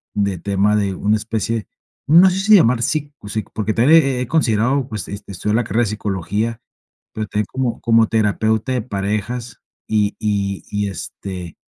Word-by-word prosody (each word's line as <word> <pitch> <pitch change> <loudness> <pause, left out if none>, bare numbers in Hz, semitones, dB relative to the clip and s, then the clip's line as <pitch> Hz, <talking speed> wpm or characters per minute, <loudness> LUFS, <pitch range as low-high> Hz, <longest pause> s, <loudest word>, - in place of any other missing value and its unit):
de 100 -3 0
tema 100 +3 +1
de 100 -2 0
una 105 +3 +1
especie, 110 0 -3 0.4
no 175 +5 +7
sé 190 - -1
si 210 +2 +6
llamar 125 - +4
sico 145 -2 -2
o 105 - -10
psico. 110 0 -4
Porque 110 -1 -1
también, 155 +8 +6
he 135 -2 -1
he - - -1
he 125 - -3
considerado, 130 -2 +1
pues, 105 -6 -5
este, 100 0 -8
estudiar 105 +5 -1
la 120 - +1
carrera 120 +1 +1
de - - -1
Psicología, 105 +3 -2 0.5
pero 110 -1 -4
también, 105 0 -1
como 130 -3 -2
como 115 -2 +4
terapeuta 110 +2 +1
de 125 - 0
parejas. 110 +3 -3 0.3
Y 105 -1 +1
y 100 -2 -1
y 105 0 -1
este, 90 -1 -7
110 Hz, 185 wpm, -19 LUFS, 100-120 Hz, 0.5 s, no